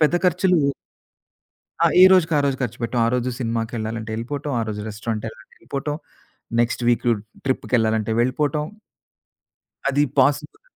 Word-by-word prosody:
పెద్ద 155 +2 +4
ఖర్చులు 180 +1 +3 1.2
ఆ! 170 - +5 0.2
ఏ - - +11
రోజుకి 175 -3 +4
ఆ - - +4
రోజు 135 -1 0
ఖర్చు 120 -1 -3
పెట్టాం. 115 +1 0
ఆ - - +2
రోజు 125 0 0
సినిమాకెళ్ళాలంటే 115 -1 -3
ఎళ్ళిపోటం. 140 +6 -4
ఆ - - 0
రోజు 105 -1 -4
రెస్టారెంట్ 110 +1 -4
ఎళ్ళాలంటే 110 0 -15
ఎళ్ళిపోటం. 145 +1 -4 0.7
Next 120 +1 0
week 120 0 +2 0.4
ట్రిప్‌కెళ్ళాలంటే 110 -4 +1
వెళ్ళిపోటం. 145 +4 0 1.2
అది 140 +1 +2 0.2
పాసిబుల్ 145 - +2
125 Hz, 135 wpm, -22 LUFS, 115-145 Hz, 1.2 s, ఏ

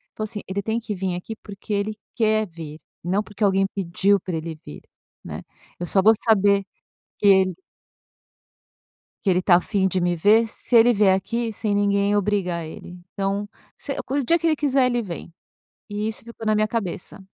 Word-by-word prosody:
falou 215 - -3
assim: 210 -1 -6
"Ele 195 +1 -2
tem 220 +3 -1
que 220 -2 -5
vir 185 -1 -2
aqui 180 +5 -6
porque 205 0 -7
ele 205 +1 0 0.2
quer 215 -1 +2
vir, 160 -3 -9 0.2
não 190 +5 0
porque 210 0 -6
alguém 195 -1 +3
pediu 195 +2 +2
pra 180 -1 -5
ele 160 0 -5
vir, 75 - -9 0.4
né. - - -7 0.4
Eu 175 - -3
só 195 - +3
vou 220 +3 +7
saber 200 -2 +4 0.6
que - - 0
ele 190 -2 +5 1.7
"que 195 - +3
ele 180 0 +3
tá 180 -1 +4
afim 190 +2 +2
de 185 -1 -1
me 175 0 +1
ver 210 +7 +4
se 230 +2 -1
ele 235 +1 +7
vier 200 -3 +4
aqui 230 +4 -2
sem 210 -1 -2
ninguém 200 0 +2
obrigar 195 -4 0
ele. 175 +3 -10
Então, 200 +1 -2 0.3
se 275 - -5
o 280 +1 +1
dia 335 +7 +3
que 335 - -1
ele 320 - +4
quiser, 275 -3 +2
ele 245 -1 +1
vem", 175 -5 -7 0.6
e 205 +1 -2
isso 220 - -3
ficou 230 -1 -9
na 215 - +3
minha 215 0 +2
cabeça. 200 -3 -4
205 Hz, 190 wpm, -23 LUFS, 185-220 Hz, 1.7 s, vou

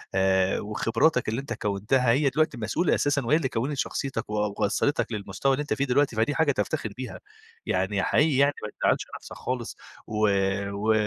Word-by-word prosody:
آآ، 95 0 +2
وخبراتك 115 +5 +1
اللي 115 +4 -2
أنت 135 -4 -5
كوّنتها 105 +5 0
هي 140 +3 +3
دلوقتي 150 -1 0
مسؤولة 120 +10 +1
أساسًا 145 -2 +1
وهي 135 +6 +4
اللي 135 -6 -1
كوّنِت 130 +6 -2
شخصيتك 130 -4 -3
و 105 -1 -1
وصّلِتك 120 +8 0
للمستوى 115 +6 -1
اللي 135 - -1
أنت 150 - -1
فيه 140 - 0
دلوقتي، 135 -2 +2
فدي 115 +7 +1
حاجة 160 -3 +3
تفتخِر 105 -6 -2
بيها - - -6 0.5
يعني، 95 +1 0
حقيقي 145 +1 +3
يعني 140 +1 +4
ما 105 - -3
تزعّلش - - +2
نفْسك - - -10
خالص 125 -2 -4 0.3
و 110 0 +1 0.4
و 105 +2 +1
120 Hz, 180 wpm, -26 LUFS, 105-140 Hz, 0.5 s, وهي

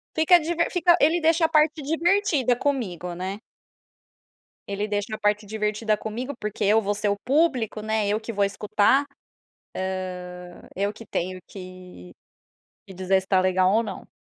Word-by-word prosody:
Fica 320 +3 +6
diver 335 +1 -1
fica 355 -1 +4
ele 325 +4 +3
deixa 325 +1 +3
a - - -11
parte 310 -1 +2
divertida 325 - +2
comigo, 210 - -2
né. 190 +3 -5 1.3
Ele 200 +1 -2
deixa 205 +1 -3
a - - -6
parte 210 +1 +1
divertida 215 +1 -1
comigo, 240 +7 -5
porque 210 0 -3
eu 210 +3 +4
vou 205 -1 -1
ser 205 0 -1
o 200 - +1
público, 260 -7 +1
né, 220 -1 0
eu 210 +2 0
que 230 - -6
vou 200 -1 +1
escutar, 210 +7 +2 1.5
hã, 175 - -15
eu 200 +2 0
que 230 - -12
tenho 185 -1 -3
que 185 - -11 0.7
que 190 - -12
dizer 190 +1 +1
se 190 - -14
tá 190 -1 +3
legal 185 0 +2
ou 230 - +3
não. 195 -4 -8
215 Hz, 165 wpm, -24 LUFS, 195-285 Hz, 1.5 s, Fica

